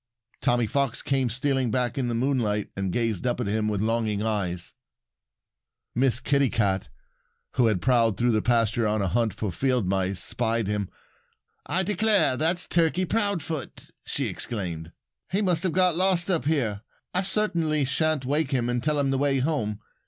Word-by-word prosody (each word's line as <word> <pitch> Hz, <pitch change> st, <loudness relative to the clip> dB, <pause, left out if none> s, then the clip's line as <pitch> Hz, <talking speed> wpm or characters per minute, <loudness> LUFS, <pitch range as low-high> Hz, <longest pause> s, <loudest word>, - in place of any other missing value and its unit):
Tommy 120 Hz, -2 st, +2 dB
Fox 135 Hz, +2 st, -1 dB
came 135 Hz, -3 st, +1 dB
stealing 130 Hz, +1 st, 0 dB
back 125 Hz, +3 st, -1 dB
in 130 Hz, -3 st, -1 dB
the 120 Hz, -, -1 dB
moonlight 115 Hz, -5 st, 0 dB
and 95 Hz, -1 st, -2 dB
gazed 115 Hz, 0 st, -1 dB
up 120 Hz, -, -1 dB
at 120 Hz, -, -1 dB
him 105 Hz, +1 st, 0 dB
with 105 Hz, -2 st, -1 dB
longing 110 Hz, -2 st, 0 dB
eyes. 95 Hz, -6 st, -1 dB, 1.2 s
Miss 125 Hz, -1 st, +2 dB
Kitty 140 Hz, -2 st, +2 dB
Cat, 100 Hz, -5 st, 0 dB, 0.6 s
who 120 Hz, -, +2 dB
had 105 Hz, -5 st, 0 dB
prowled 115 Hz, -6 st, +3 dB
through 120 Hz, +2 st, +2 dB
the 110 Hz, -1 st, +1 dB
pasture 115 Hz, -1 st, +1 dB
on 105 Hz, -1 st, 0 dB
a -, -, 0 dB
hunt 115 Hz, +3 st, +1 dB
for 100 Hz, 0 st, -4 dB
field 125 Hz, +1 st, 0 dB
mice, 95 Hz, 0 st, -1 dB
spied 115 Hz, +3 st, 0 dB
him. 105 Hz, -1 st, -2 dB, 0.8 s
"I 185 Hz, +2 st, +2 dB
declare, 205 Hz, -6 st, +3 dB
that's 165 Hz, +5 st, +1 dB
Turkey 170 Hz, +2 st, +2 dB
Proudfoot!" 175 Hz, -, -2 dB
she -, -, -2 dB
exclaimed. 85 Hz, -7 st, -4 dB, 0.4 s
"He 200 Hz, +3 st, +1 dB
must 180 Hz, -4 st, +2 dB
have 185 Hz, -, 0 dB
got 185 Hz, -2 st, +3 dB
lost 185 Hz, 0 st, +2 dB
up 170 Hz, -5 st, 0 dB
here. 120 Hz, -10 st, 0 dB, 0.3 s
I 185 Hz, -, +2 dB
certainly 170 Hz, -7 st, 0 dB
shan't 145 Hz, +1 st, 0 dB
wake 145 Hz, +2 st, 0 dB
him 125 Hz, -4 st, 0 dB
and 120 Hz, 0 st, -1 dB
tell 150 Hz, -1 st, +1 dB
him 140 Hz, -1 st, +1 dB
the 135 Hz, -, 0 dB
way 140 Hz, -1 st, +2 dB
home. 130 Hz, -7 st, -1 dB
125 Hz, 175 wpm, -25 LUFS, 110-155 Hz, 1.2 s, prowled